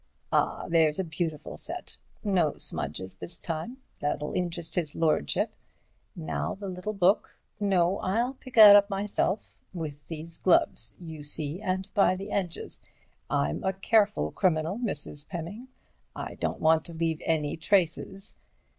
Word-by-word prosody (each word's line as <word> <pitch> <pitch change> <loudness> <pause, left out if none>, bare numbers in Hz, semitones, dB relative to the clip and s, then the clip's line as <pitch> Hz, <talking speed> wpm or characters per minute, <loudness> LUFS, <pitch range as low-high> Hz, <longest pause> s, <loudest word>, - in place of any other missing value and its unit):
Ah! - - +1
there's 160 -2 +3
a 190 - 0
beautiful 160 -2 -4
set. 350 +2 -6 0.3
No 180 -8 +2
smudges 95 +6 -4
this 170 - -8
time. 175 +10 -4 0.2
That'll 145 0 -2
interest 170 -2 -2
his 160 -5 -1
lordship. 155 - +1 0.6
Now 75 -2 -3
the 200 0 -7
little 185 +4 -4
book—no, 195 -1 +1
I'll 230 +7 0
pick 260 -1 -13
that 210 -3 +11
up 205 0 +6
myself—with 185 -6 -3
these 165 0 -7
gloves, 140 -9 +2
you 160 -4 -8
see, 150 +4 -2
and 190 -1 -1
by 195 -2 +4
the 195 +2 -7
edges—I'm 165 - -4
a 190 - +1
careful 195 - +2
criminal, 170 +3 +1
Mrs. 150 - -3
Pemming, 185 +8 -6 0.5
I - - -5
don't - - -2
want 160 0 +4
to 170 - -6
leave 160 -1 -1
any 155 -3 0
traces. 190 +3 0
170 Hz, 135 wpm, -28 LUFS, 155-195 Hz, 0.6 s, that